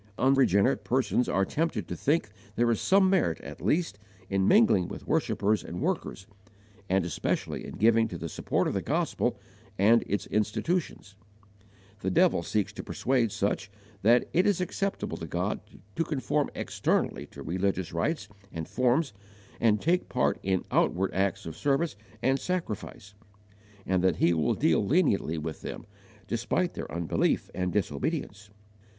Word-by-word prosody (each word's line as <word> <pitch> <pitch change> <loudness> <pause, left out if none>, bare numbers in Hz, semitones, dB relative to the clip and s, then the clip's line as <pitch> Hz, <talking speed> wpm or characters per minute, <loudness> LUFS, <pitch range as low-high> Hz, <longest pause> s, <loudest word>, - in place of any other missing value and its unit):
Unregenerate 130 -3 +3
persons 125 0 +1
are 95 - +2
tempted 165 - -2
to - - -4
think 145 -8 0 0.2
there 120 0 +3
is 115 - 0
some 195 0 +4
merit 185 - +2
at - - -9
least 160 - 0 0.3
in 95 -1 +2
mingling 190 - +5
with - - -8
worshippers 105 +1 +1
and 90 - -6
workers, 95 - -2 0.6
and 95 -1 +2
especially 85 - -2
in - - -8
giving 115 +1 +4
to 90 - -6
the 85 - -5
support - - -1
of - - -1
the - - -1
gospel - - 0 0.4
and 110 +4 +5
its 100 -1 -1
institutions. 105 - -1 0.9
The 95 - -1
devil 90 - +3
seeks 105 +4 -1
to - - -7
persuade 125 -4 0
such 100 +1 -1 0.3
that 120 +4 +4
it 180 +4 +3
is 205 -4 +2
acceptable 195 +2 -2
to - - -6
God - - -1 0.4
to - - +1
conform 135 -9 -1
externally - - -1
to - - -11
religious 95 -1 -1
rites, 105 - -1 0.2
and 80 -1 -5
forms, 130 +2 +1 0.5
and 105 -2 +3
take 175 - +1
part - - +1
in 95 -1 0
outward 95 +2 +2
acts 95 -1 0
of 80 -1 -6
service 145 - 0 0.3
and 135 +1 +2
sacrifice, 110 - -4 0.7
and 95 -1 +1
that 95 -3 +3
He 85 +1 +3
will 80 -2 +1
deal 80 +5 +2
leniently 100 - +2
with 80 0 -5
them, - - -7 0.4
despite 120 +11 0
their - - -6
unbelief 85 -1 0
and 90 -1 -1
disobedience. 105 - -2
105 Hz, 155 wpm, -28 LUFS, 95-140 Hz, 0.9 s, mingling